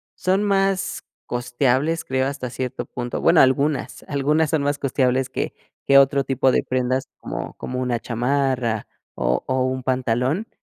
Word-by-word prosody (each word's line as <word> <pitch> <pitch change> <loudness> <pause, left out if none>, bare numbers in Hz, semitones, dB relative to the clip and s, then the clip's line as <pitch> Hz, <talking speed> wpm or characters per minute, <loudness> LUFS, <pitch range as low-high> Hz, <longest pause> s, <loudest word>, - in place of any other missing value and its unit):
Son 190 +3 +1
más 195 -1 0 0.2
costeables, 130 +6 0
creo, 130 0 0
hasta 135 -3 -4
cierto 130 +1 -4
punto. 120 -1 -4
Bueno, - - +5
algunas, 140 +3 +1
algunas 150 +2 +1
son 155 -3 +1
más 145 0 0
costeables 130 -1 +1
que - - -3 0.3
que 140 - +6
otro 140 0 +3
tipo 135 0 +2
de - - +2
prendas, 130 +1 -1
como - - -5
como 125 0 -5
una 125 -2 -1
chamarra 125 -2 0 0.3
o 60 +1 0
o 130 0 0
un 130 0 -2
pantalón. 130 - 0
130 Hz, 155 wpm, -22 LUFS, 125-145 Hz, 0.3 s, que